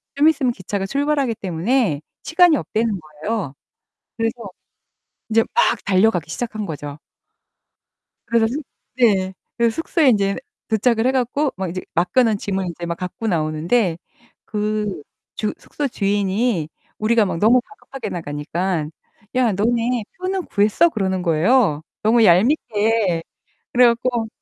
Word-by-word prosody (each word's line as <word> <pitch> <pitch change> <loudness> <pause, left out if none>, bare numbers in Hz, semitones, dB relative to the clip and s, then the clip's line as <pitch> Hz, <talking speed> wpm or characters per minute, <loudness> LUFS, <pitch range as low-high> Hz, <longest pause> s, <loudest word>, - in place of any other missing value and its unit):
좀 290 +2 +4
있으면 270 -6 +1
기차가 195 0 -4
출발하기 280 0 0
때문에 185 - 0 0.2
시간이 330 +1 +5
없다는 220 -3 -1
거예요. 155 +2 -4 0.6
그래서 225 -1 0 1.0
인제 225 0 +4
막 - - +2
달려가기 190 -5 +2
시작한 215 +3 -4
거죠. 145 -4 -6 1.3
그래서는 235 +5 +1 0.3
네. 195 -6 +3 0.2
그래서 235 -1 +2
숙소에 325 -3 +2
인제 200 -4 +2 0.3
도착을 225 +2 +2
해 - - +3
갖고 265 +3 0
막 190 -2 -3
이제 185 +2 -4
맡겨놓 210 +6 +2
짐을 190 -2 -2
이제 170 0 -6
막 170 0 -3
갖고 180 +6 -5
나오는데 165 +2 +1 0.5
그 210 -4 -2 0.4
주 215 - -1
숙소 290 - -3
주인이 200 - 0 0.3
우리가 225 +1 +3
막 185 - -2
너무 235 +7 +4
다급하게 275 -10 -8
나가니깐 160 +1 -3 0.5
"야 250 -3 +3
너네 230 +4 0
표는 370 0 -2
구했어?" 210 +12 +3
그러는 190 - -1
거예요, 170 - +2 0.2
너무 225 +2 +4
얄밉게. 210 - +2 0.5
그래 250 0 +6
갖고 235 0 +1
215 Hz, 290 characters per minute, -21 LUFS, 185-245 Hz, 1.3 s, 그래